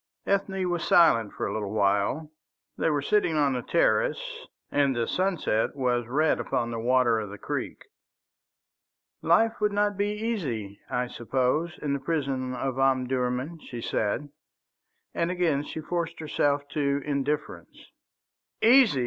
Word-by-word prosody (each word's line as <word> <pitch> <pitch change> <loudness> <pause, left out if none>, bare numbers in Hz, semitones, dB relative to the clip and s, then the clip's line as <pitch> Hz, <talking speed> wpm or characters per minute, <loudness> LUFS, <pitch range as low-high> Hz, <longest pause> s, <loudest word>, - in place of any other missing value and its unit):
Ethne 195 -1 0
was 175 -1 -1
silent 115 -11 +4
for - - -4
a - - -2
little 105 -1 -3
while. 105 +9 +1 0.4
They - - +1
were 145 -2 0
sitting 190 -4 +2
on 145 -2 +3
the 125 - -2
terrace, - - 0 0.2
and 140 -2 +2
the 120 -1 0
sunset 180 - 0
was 125 -3 0
red 150 +5 +2
upon 120 0 -1
the 115 - -3
water 120 -1 +3
of 105 -2 -5
the 105 - -8
creek. - - -4 1.4
"Life 225 +7 +3
would 210 0 +2
not 205 0 +1
be 205 0 +1
easy, 165 - -3
I 125 0 0
suppose, 130 +8 -1
in 145 -2 0
the 140 - -1
prison 135 -4 -2
of 130 +1 -3
Omdurman," 130 +3 0
she 120 -5 -8
said, 115 +5 -1 0.8
and 170 - 0
again 175 -6 +1
she 160 - -6
forced 170 +1 -3
herself 145 -2 0
to 140 -2 0
indifference. 145 +1 -3 0.7
"Easy!" 235 - +6
145 Hz, 145 wpm, -27 LUFS, 125-175 Hz, 1.4 s, Easy